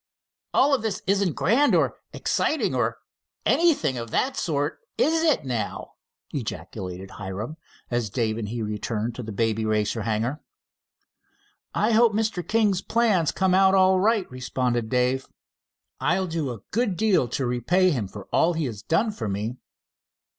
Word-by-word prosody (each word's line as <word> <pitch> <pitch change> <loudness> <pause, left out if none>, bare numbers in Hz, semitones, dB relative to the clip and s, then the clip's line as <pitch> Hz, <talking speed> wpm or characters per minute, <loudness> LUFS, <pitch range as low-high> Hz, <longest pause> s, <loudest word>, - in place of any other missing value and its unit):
"All 280 +1 +4
this 215 -3 -3
isn't 195 -3 +2
grand, 275 +8 +3
or - - +2
exciting, - - 0
or - - 0 0.5
anything 220 - +3
of 115 0 -6
that 260 - 0
sort, 150 -1 -1 0.2
is 320 +1 +3
it, 310 - +2
now!" 115 -5 -3 0.4
ejaculated 95 +1 -5
Hiram, 105 +9 -6 0.3
as 120 -3 0
Dave 110 0 -1
and 105 -3 -4
he 115 0 -3
returned 105 +2 -2
to 125 - -6
the 110 -2 -6
Baby 110 +1 0
Racer 110 +1 0
hangar. 115 +7 -1 1.3
"I 215 - +2
hope 225 0 +5
Mr. 215 -3 0
King's 205 -1 +1
plans 215 -10 +2
come 190 -1 +1
out, 190 0 +5
all 190 0 +5
right," 210 0 +2
responded 125 -2 -1
Dave. 125 +1 +1 0.7
"I'll 170 +8 +1
do 165 -5 -2
a 115 -5 -6
good 220 -5 0
deal 205 - +3
to 130 +3 -2
repay 175 +10 +2
him 120 - -1
for 100 0 -10
all 170 +2 +4
he 160 -2 -1
has 110 -5 -5
done 180 - +1
for 205 - -4
me." 105 +5 -3
140 Hz, 155 wpm, -25 LUFS, -, 1.3 s, hope